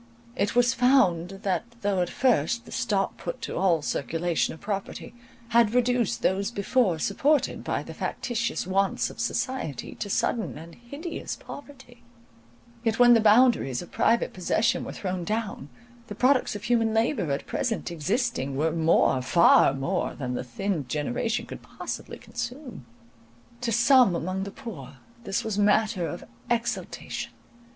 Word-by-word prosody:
It 205 -1 -1
was 245 -1 +4
found, 195 -8 +2
that, 190 +1 0 0.2
though 200 -2 +1
at 175 - -1
first 235 - +1
the - - -13
stop 210 -7 -1
put 170 - -5
to - - -4
all 170 -4 +2
circulation 165 +4 -1
of 160 - -10
property, 200 +1 -5 0.4
had 235 -1 +3
reduced 245 -3 +1
those 195 +2 +1
before 210 -3 +1
supported 280 - +1
by - - -2
the - - -9
factitious 235 -5 -2
wants 195 +1 0
of - - -14
society 255 - -3
to 205 - -6
sudden 220 0 -1
and 165 +2 -11
hideous 285 - -6
poverty, 265 -4 -12 0.8
yet 225 -2 +1
when 245 -1 +7
the 230 - +6
boundaries 215 - +4
of - - -14
private 235 - +2
possession 190 +5 +1
were - - -6
thrown 185 -2 -4
down, 210 -7 -3 0.4
the 205 - -7
products 255 0 +2
of 205 - -7
human 230 -2 +1
labour 225 - +1
at 140 0 -2
present 225 -7 -2
existing 170 - -1
were 160 +3 +1
more, 160 -5 +3
far 135 +5 +5
more, 135 0 -2
than 125 -3 -4
the 125 - -3
thinned 150 +2 -3
generation 150 - -1
could - - -9
possibly - - -7
consume. 245 - -7 0.7
To 240 -1 -1
some 235 -3 +5
among 185 +3 -2
the - - -5
poor 160 - -9 0.3
this 195 - -1
was 215 -2 -2
matter 205 -3 +2
of - - -6 0.3
exultation. 235 -1 -3
205 Hz, 150 wpm, -26 LUFS, 170-240 Hz, 0.8 s, when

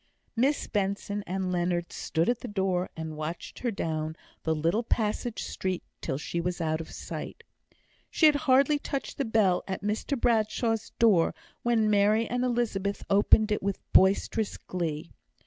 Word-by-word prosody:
Miss 270 +5 +2
Benson 200 0 -2
and 185 0 -2
Leonard 175 -1 -1
stood 165 +1 -1
at 245 -1 +1
the - - -6
door, 190 -3 0
and 160 -1 -5
watched 155 +3 -6
her 245 - -1
down 160 -6 -2 0.3
the 160 -1 0
little 165 +8 +1
passage 225 0 -1
street 185 -1 -3 0.2
till 135 - -2
she 170 +3 -3
was 180 +1 -2
out 160 -1 0
of 160 - -9
sight. - - -7 0.7
She 320 - +3
had 305 - +8 0.2
hardly 275 +3 +5
touched 275 0 -4
the 275 - +1
bell 215 -5 +3
at 190 0 -4
Mr 220 +6 -1
Bradshaw's 225 -1 +1
door, 205 -8 +4 0.3
when 230 -2 +2
Mary 210 +2 +3
and 245 +1 -1
Elizabeth 220 -5 -1
opened 210 +2 +5
it 210 - +1
with 195 0 -1 0.2
boisterous 200 +3 +3
glee. 165 -3 -4
200 Hz, 160 wpm, -28 LUFS, 175-230 Hz, 0.7 s, had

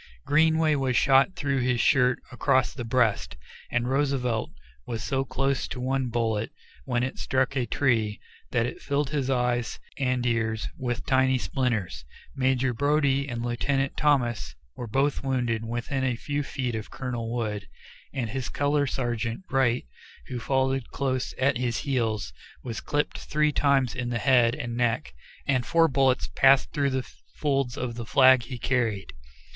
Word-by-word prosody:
Greenway 160 +1 +3
was 135 -3 +1
shot 135 +6 +4
through 140 -5 0
this 125 -1 +1
shirt 125 0 +4
across 130 -1 +2
the 125 - -5
breast, 115 - +1 0.3
and 125 0 0
Roosevelt 130 -4 0 0.4
was 115 -2 -4
so 135 0 0
close 135 0 -1
to - - -6
one 130 +1 0
bullet, 115 -2 -1 0.4
when 120 0 0
it 130 - -4
struck 130 +1 0
a 125 -3 0
tree, 115 -6 +1 0.3
that 120 -2 +1
it 125 - -6
filled 140 0 -1
his 140 -3 -1
eyes 125 -2 0 0.2
and 125 -2 0
ears 110 -2 0
with 125 -1 -3
tiny 130 -1 +3
splinters. 120 - -2 0.3
Major 130 -1 +1
Brodie 140 +1 +2
and 120 -1 -3
Lieutenant 135 +3 -1
Thomas 120 - +1 0.2
were 120 - -6
both 135 +6 0
wounded 120 -4 0
within 120 +4 -3
a 125 -2 +1
few 145 +4 -3
feet 130 -3 -3
of 110 -1 -5
Colonel 120 -3 -4
Wood, 105 -4 -3 0.4
and 120 -5 -3
his 130 -3 -3
color 145 0 +1
sergeant, 120 - -2
Wright, 130 -3 +2 0.4
who 125 -2 -4
followed 135 0 0
close 130 -2 -2
at 130 -1 +2
his 120 -2 -1
heels, 110 - -1 0.3
was 115 -3 -5
clipped 145 0 -1
three 150 0 +1
times 140 -3 +2
in 120 -1 -3
the 120 - -1
head 120 -2 +4
and 120 -1 -5
neck, 120 - 0 0.3
and 130 -3 +1
four 165 +6 +4
bullets 135 -3 +2
passed 135 0 +5
through 140 -2 +1
the 130 -1 -2 0.3
folds 135 -3 0
of 125 -3 -3
the 115 0 -6
flag 130 -1 +6
he 125 +2 -7
carried. 115 -6 -1
130 Hz, 160 wpm, -26 LUFS, 120-135 Hz, 0.4 s, flag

